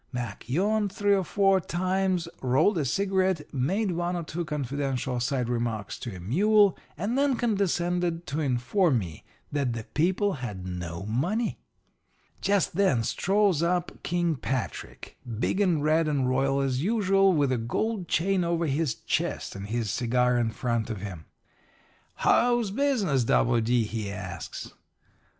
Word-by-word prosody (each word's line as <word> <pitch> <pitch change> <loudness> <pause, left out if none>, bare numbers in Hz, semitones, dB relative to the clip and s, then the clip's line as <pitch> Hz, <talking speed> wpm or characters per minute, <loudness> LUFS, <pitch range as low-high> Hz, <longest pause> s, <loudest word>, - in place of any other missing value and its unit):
Mac 120 -3 -5
yawned 205 +7 +1
three 205 +1 +2
or 195 -1 +2
four 195 +1 +3
times, 185 0 0
rolled 150 +9 +3
a 145 - 0
cigarette, 190 0 0
made 185 - 0
one 175 +1 -1
or 170 - -3
two 170 +2 -4
confidential 135 -4 -2
side 125 0 -1
remarks 115 -4 -2
to 115 -5 -6
a - - -8
mule, 200 - +4 0.2
and 205 +7 -1
then 275 -1 +2
condescended 175 -6 0
to 145 +3 -3
inform 140 +4 +2
me 85 -8 -5 0.3
that 140 -4 0
the 115 -1 -5
people 190 +6 +2
had 100 -7 -5
no 90 -1 -5
money. 175 - -1 0.8
"Just 200 -3 +1
then 185 -11 +3
up - - -3
strolls 195 - +2 0.4
King 170 -2 0
Patrick, 125 - -5 0.2
big 185 +10 0
and 170 -7 +2
red 155 +1 +3
'and 140 -4 +1
royal 135 +2 +1
as 130 -1 0
usual, 195 0 +3
with 145 -6 +2
the 125 - +1
gold 185 - -2
chain 185 +3 +1
over 170 0 0
his 145 -3 0
chest - - -2
and 100 0 -6
his 110 -2 -1
cigar 125 +1 +2
in 120 -2 +1
front 115 -1 -2
of 105 -5 -4
him. 95 -6 -7 0.9
"'How's 240 -4 +3
business, 210 - +1
W. 120 +1 +3
D.?' 120 +1 +2
he 105 -2 -4
asks. 95 -2 -7
155 Hz, 150 wpm, -27 LUFS, 120-190 Hz, 0.9 s, mule